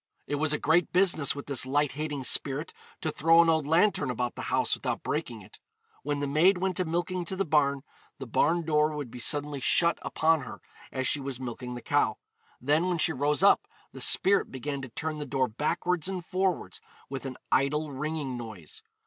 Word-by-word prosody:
'It - - -5
was 145 +1 +1
a 150 - +1
great 170 +3 +2
business 175 -7 +3
with 145 - -7
this 140 -3 +2
light 145 +2 +1
hating 145 -1 -4
spirit 140 +5 +1 0.3
to 155 - -1
throw 165 +3 +4
an 170 -1 +6
old 160 -3 0
lanthorn 165 -3 +2
about 125 0 -2
the - - -7
house - - +1
without - - -3
breaking - - -3
it.' - - -17 0.4
When 145 0 -2
the 145 - -1
maid 165 +7 +4
went 185 0 -1
a 185 - +1
milking 175 +2 -2
to 190 - -2
the 195 +1 -1
barn, 140 -3 +1 0.3
the - - -7
barn 165 +8 +1
door 155 -1 +1
would 145 -5 -5
be 125 - -9
suddenly 145 +2 -1
shut 170 +6 +3
upon 160 -1 +1
her 125 - -9 0.3
as 130 -1 -1
she 150 - +2
was 135 -2 -5
milking 125 0 -6
the 120 - -8
cow; - - +1 0.4
then 150 +7 +1
when 180 -2 0
she 160 0 +2
rose 145 +5 0
up 200 - +5 0.2
the - - -9
spirit 195 +1 +4
began 140 +2 -5
to 135 - -7
turn 155 +5 -4
the - - -3
door 130 -1 0
backwards 165 +8 -1
and 185 -3 -5
forwards 185 -1 -2 0.3
with 135 0 -5
an 130 - -7
idle 150 +3 +1
ringing 145 -1 -3
noise. 110 -10 -9
150 Hz, 205 wpm, -28 LUFS, 135-165 Hz, 0.4 s, an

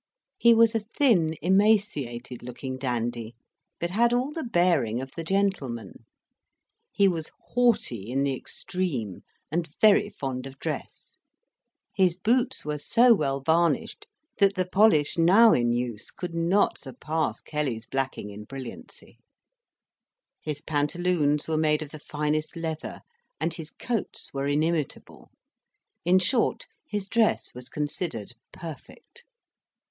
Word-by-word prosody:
He 235 -1 +6
was 230 0 +5
a 225 - +2
thin, 210 - +2
emaciated 180 - +1
looking 130 +2 -6
dandy, 120 -2 -3 0.4
but 170 +1 -2
had 235 +4 +3
all 255 +4 +1
the 320 - -4
bearing 175 - +2
of 130 0 -6
the 165 - -6
gentleman. 160 - -2 0.9
He 200 - +4
was 165 -4 -2 0.2
haughty 215 - +1
in 135 +2 0
the 140 -1 0
extreme, 130 - -4 0.3
and 165 0 -1
very 210 -1 +5
fond 135 -7 -5
of 135 0 -12
dress; - - -6 0.7
his 180 -3 +2
boots 235 +2 +1
were 150 0 -2
so 235 - +5
well 140 -8 0
varnished 165 +4 +1 0.3
that 200 -1 +4
the 185 -1 0
polish 185 -5 +3
now 205 +7 +7
in 120 -1 +2
use 120 -2 -3
could 175 -2 -6
not 170 +5 +2
surpass 160 -9 -3
Kelly's 135 -7 -3
blacking 135 -4 -3
in 105 +1 -9
brilliancy; 135 - -10 1.2
his 150 -2 -4
pantaloons 150 0 0
were 160 -1 0
made 155 0 +2
of 150 - -11
the 155 - -9
finest 150 +1 -2
leather, 160 -2 -5 0.4
and 170 - -1
his 160 -2 -8
coats 235 +3 -4
were 135 0 -2
inimitable: 155 0 -2 0.7
in 180 +2 +5
short, 225 +6 +1 0.2
his 205 -7 -3
dress 225 +1 +1
was 125 +1 -9
considered 145 - -4 0.2
perfect. 170 - -11
160 Hz, 130 wpm, -26 LUFS, 135-195 Hz, 1.2 s, now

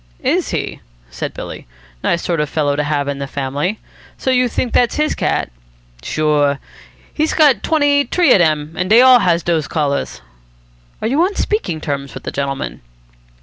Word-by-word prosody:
"Is - - +1
he?" - - -4 0.3
said - - -4
Billy. - - -8 0.4
"Nice 170 - 0
sort 170 -2 -1
of 150 -1 -1
fellow 145 -2 0
to 150 - 0
have 145 -1 -1
in 140 -1 -3
the 140 - -4
family. 140 +9 -2 0.4
So 260 - -1
you 250 -1 +3
think 240 0 -2
that's 245 - +3
his 305 0 +1
cat?" - - -1 0.5
"Sure. 145 - +1 0.6
He's 310 +1 0
got 295 -5 +4
twenty 290 -2 +2
t'ree 350 -7 +2
of - - +5
dem, 155 -2 +1
and 185 +1 -2
dey 225 +3 +7
all 255 -1 +7
has 170 -5 +1
dose 165 -3 0
collars." 145 -3 -2 0.8
"Are - - +1
you 275 +7 +1
on 385 +3 +1
speaking 420 - -1
terms 140 -2 -4
with - - -8
the - - -4
gentleman?" 135 - -4
165 Hz, 180 wpm, -17 LUFS, -, 0.8 s, dey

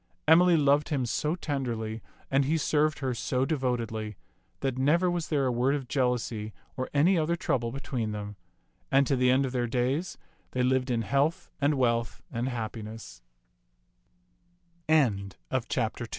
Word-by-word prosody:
Emily 170 +2 +6
loved 145 0 +3
him 135 -5 0
so 150 +7 -1
tenderly, 120 -9 -3 0.3
and 135 0 +3
he 160 +4 +1
served 155 0 +1
her 130 -2 0
so 125 +2 0
devotedly, 115 -7 -2 0.5
that 135 -2 -1
never 170 +7 +3
was 175 -2 -2
there 145 -3 +1
a 130 - +2
word 125 +4 +2
of 135 -3 -4
jealousy 120 -5 -1 0.2
or 130 -2 -3
any 165 +5 +4
other 160 +2 +1
trouble 120 -8 -1
between 120 -4 -3
them; 105 0 -5 0.6
and 135 +1 +5
to 135 - +1
the 125 0 +3
end 130 +2 +4
of 130 - -3
their 125 -1 0
days 130 +9 -1 0.4
they 125 - +1
lived 130 +1 +1
in 115 -2 0
health 145 - 0
and 145 +2 +3
w 115 -2 -2
130 Hz, 140 wpm, -28 LUFS, 120-145 Hz, 0.6 s, Emily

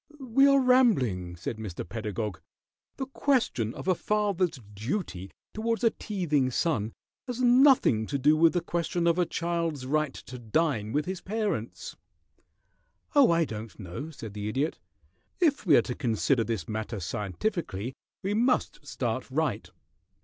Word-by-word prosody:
"We 270 +1 +4
are 275 0 +6
rambling," 135 - +3
said 95 +6 -5
Mr. 100 -6 -6
Pedagog. 105 -1 -4 0.6
"The 265 - -2
question 255 - 0
of - - -8
a 185 - +5
father's 195 -5 0
duty 105 - -4 0.2
towards 230 +2 -1
a 230 - +5
teething 155 - 0
son 115 -5 0 0.3
has 250 -1 -4
nothing 245 - +5
to 140 - -1
do 145 +3 +4
with 165 +1 +5
the 175 - +1
question 170 0 -1
of 170 +1 +3
a 175 - +2
child's 165 -5 -2
right 150 0 0
to 125 - -9
dine 115 -2 0
with 150 +4 0
his 185 -1 -4
parents." 215 +1 -3 1.2
"Oh, 285 -3 +6
I 165 -1 +3
don't 110 -3 -7
know," 100 - -6
said 115 -9 -9
the 105 0 -4
Idiot. 135 +8 -1 0.6
"If 300 - +2
we 150 - +7
are 120 - +4
to 125 - -4
consider 120 0 +1
this 110 -8 -3
matter 110 0 -4
scientifically 105 - -3 0.3
we 195 +2 0
must 245 +4 +1
start - - -3
right. - - -1
155 Hz, 150 wpm, -28 LUFS, -, 1.2 s, we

